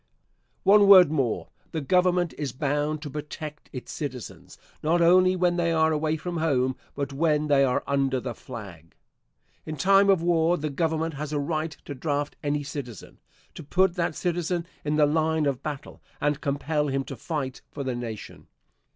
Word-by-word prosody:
One 205 0 +6
word 185 -6 +9
more. 135 -7 -1 0.2
The 160 - -1
Government 180 +2 +2
is 140 -5 -4
bound 145 +2 -1
to 150 - -5
protect 150 0 -7
its 125 - -7
citizens, 130 -6 -7 0.2
not 165 +3 +2
only 185 +2 +5
when 180 -1 +1
they 170 -1 +1
are 160 -1 +3
away 155 +1 0
from 175 +2 -5
home, 130 -5 +1 0.2
but 140 -1 -3
when 150 0 +1
they 140 -1 +5
are 125 -2 +1
under 135 -2 +1
the 125 -1 -5
flag. 95 -10 -10 0.7
In 155 0 -6
time 195 +5 +4
of 190 -4 +4
war 170 0 +3
the 155 -1 -3
Government 160 +2 -1
has 145 +1 -5
a 150 - -1
right 155 +1 -2
to 145 - -5
draft 145 +1 -2
any 145 0 -1
citizen; 140 -7 -8 0.3
to - - -9
put 185 +5 +2
that 170 -3 -1
citizen 175 -1 -1 0.2
in 150 0 0
the 150 -1 +5
line 160 +1 +1
of 140 -2 -1
battle, 145 -2 -7 0.2
and 145 0 0
compel 150 +1 -1
him 135 -1 -1
to - - -7
fight 140 -5 -4
for 140 - -6
the 130 -1 -2
nation. 115 -3 -7
150 Hz, 175 wpm, -26 LUFS, 140-165 Hz, 0.7 s, word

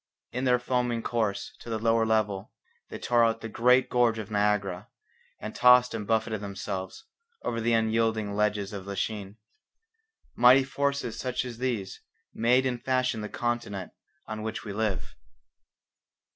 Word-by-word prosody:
In 125 +2 -2
their 125 -1 +4
foaming 125 -2 -1
course 110 -4 -1
to - - -10
the 110 - -1
lower 115 0 +2
level 105 -3 0 0.4
they - - -6
tore 120 -1 +2
out 115 0 +1
the - - -5
great 125 +3 +3
gorge 120 -2 +2
of 110 -1 -6
Niagara, 105 -3 0 0.5
and 110 - -6
tossed 125 0 +6
and 105 -3 -4
buffeted 110 -1 0
themselves 100 -2 -5 0.4
over 115 - -2
the 115 +1 +1
unyielding 110 -2 +1
ledges 105 -1 0
of 100 -1 -7
Lachine. 100 0 -4 1.0
Mighty 125 +3 +6
forces 140 -3 -2
such 125 -1 -2
as 120 -2 -7
these 115 -7 -3 0.3
made 125 +3 +3
and 125 -2 -2
fashioned 130 -4 0
the 105 - -5
continent 120 -6 -3 0.3
on 110 -1 -6
which 110 0 -4
we 105 - -5
live. 105 -3 -2
115 Hz, 150 wpm, -28 LUFS, 105-125 Hz, 1.0 s, tossed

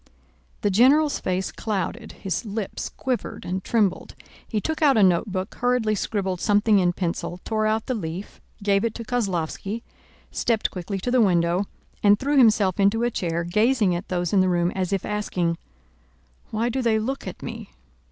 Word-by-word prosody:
The 205 - +1
general's 280 +8 +4
face 185 0 -2
clouded, 200 -6 -3
his 190 0 -3
lips 210 -2 -4
quivered 255 -2 -4
and 185 +1 -3
trembled. 210 -5 0 0.3
He 215 - -1
took 315 +8 -3
out 280 -5 +5
a 210 - +5
notebook, 185 +2 +1
hurriedly 245 -3 +1
scribbled 195 -3 -2
something 210 0 +4
in 175 -1 +2
pencil, 175 0 -3
tore 215 -1 0
out 220 0 0
the 255 - -1
leaf, 180 -2 -6 0.2
gave 200 -1 +2
it 230 -1 -1
to 230 - -5
Kozlóvski, 205 -2 -2 0.5
stepped 230 -3 0
quickly 185 +2 -4
to 220 +6 -3
the 255 -1 +4
window, 175 -1 +2 0.4
and 205 0 +5
threw 280 +6 0
himself 215 -8 +4
into 200 +4 +3
a 240 - +1
chair, 170 -4 -1
gazing 210 +3 +2
at 175 - -5
those 175 -1 -1
in 200 - +5
the 185 - +3
room 175 0 +1
as 185 -1 -2
if 195 -2 -1
asking, 180 -5 -1 0.9
"Why 220 +2 -1
do 260 +2 -1
they 230 -3 +2
look 260 +6 -3
at - - -7
me?" - - -7
205 Hz, 175 wpm, -24 LUFS, 185-230 Hz, 0.9 s, out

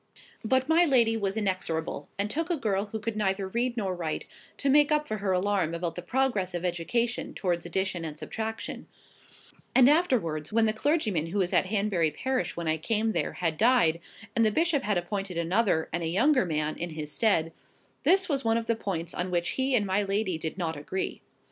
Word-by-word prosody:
But 260 +3 +1
my 325 +2 +5
lady 240 -8 +4
was 200 -1 -1
inexorable, 170 -7 -2
and 200 +1 0
took 325 - -2
a 345 - +1
girl 205 -6 0
who 220 +1 -5
could 225 0 -3
neither 195 -2 0
read 240 +4 -1
nor 195 -4 -1
write, 165 -3 -3 0.3
to 280 - -2
make 290 +2 +5
up 300 0 +2
for 215 - -2
her 195 -1 -1
alarm 185 -3 +1
about 170 0 -3
the 175 - -6
progress 200 -3 0
of 175 +1 -3
education 225 +8 -1
towards 175 -3 -1
addition 185 0 -2
and 155 -2 -6
subtraction; 220 +6 -5 0.9
and 255 -1 +7
afterwards, 235 - +2
when 225 +1 +3
the 215 - +2
clergyman 220 - 0
who 180 +5 -4
was 185 -3 0
at - - +3
Hanbury 195 -5 +1
parish 260 - -2
when 170 -1 -3
I 160 0 +2
came 220 +7 0
there, 175 - -1
had 165 -3 -1
died, 220 -9 +4 0.4
and 230 - +4
the 220 - +5
bishop 320 +4 +2
had 205 -3 0
appointed 185 +1 -3
another, 170 0 +1
and 170 - -1
a 165 - -1
younger 250 - +3
man, 155 -1 -1
in 175 - -3
his 155 -2 -5
stead, 165 -5 +2 0.5
this 380 0 +4
was 275 -4 0
one 225 0 +2
of 230 - -2
the 230 - +1
points 175 -6 -4
on 180 +1 -2
which 175 -1 0
he 265 0 0
and 210 -4 +2
my 190 +1 +1
lady 195 -3 -1
did 160 +2 -4
not 165 -3 -2
agree. 150 +6 -4
200 Hz, 205 wpm, -28 LUFS, 170-230 Hz, 0.9 s, and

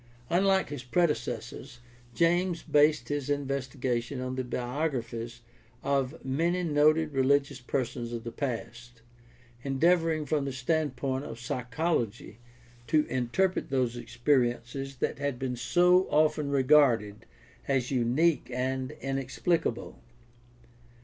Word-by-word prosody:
Unlike 190 +1 +3
his 145 -3 -5
predecessors, 135 -3 -2 0.4
James 175 +1 +2
based 150 +1 +3
his 145 -1 -2
investigation 135 -2 -2
on 130 0 -3
the 130 - -2
biographies 120 -2 -3 0.4
of 140 +1 -1
many 170 +7 0
noted 155 0 +3
religious 140 +1 +2
persons 120 -1 -3
of 115 -1 -5
the 115 - -5
past, 120 -2 -6 0.6
endeavoring 160 +3 +2
from 145 -2 0
the 135 - -2
standpoint 135 -1 -1
of 115 0 -8
psychology 120 -2 -2 0.5
to 155 -1 +3
interpret 130 +10 0
those 130 -3 0
experiences 120 +1 -1
that 125 - -2
had 140 -3 -2
been 125 0 -3
so 180 +8 +3
often 150 -1 +2
regarded 130 -7 +3 0.4
as 135 -2 0
unique 135 +7 +2
and 130 +2 -2
inexplicable. 135 0 -2
135 Hz, 110 wpm, -29 LUFS, 125-150 Hz, 0.6 s, Unlike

